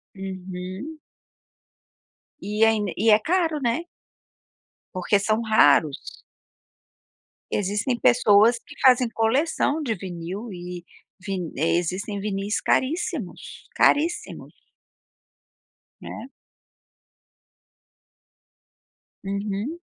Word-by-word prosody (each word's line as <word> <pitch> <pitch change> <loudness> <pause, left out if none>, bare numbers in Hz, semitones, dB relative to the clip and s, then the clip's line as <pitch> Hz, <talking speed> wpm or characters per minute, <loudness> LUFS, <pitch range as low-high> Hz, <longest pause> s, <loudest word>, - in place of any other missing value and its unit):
Uhum. 190 - -7 1.4
E 210 +2 +2
ain 215 -2 +1
e 220 +3 +2
é 210 0 +7
caro, 325 - 0
né. 260 +8 -1 1.1
Porque 185 +3 +1
são 215 +3 0
raros. 155 -9 +2 1.3
Existem 210 +5 -1
pessoas 230 0 +5
que 285 - -13
fazem 250 -2 +5
coleção 280 +7 +1
de 230 -5 -1
vinil 185 +4 -7
e 175 -1 -8 0.4
vi 190 -4 -4
eh, 160 +3 +2
existem 190 +4 -3
vinis 200 0 -2
caríssimos, 285 - -2
caríssimos. 325 +4 +1 1.5
Né. 230 +4 -8 3.0
Uhum. 205 +10 -3
210 Hz, 80 wpm, -24 LUFS, 190-245 Hz, 3.0 s, é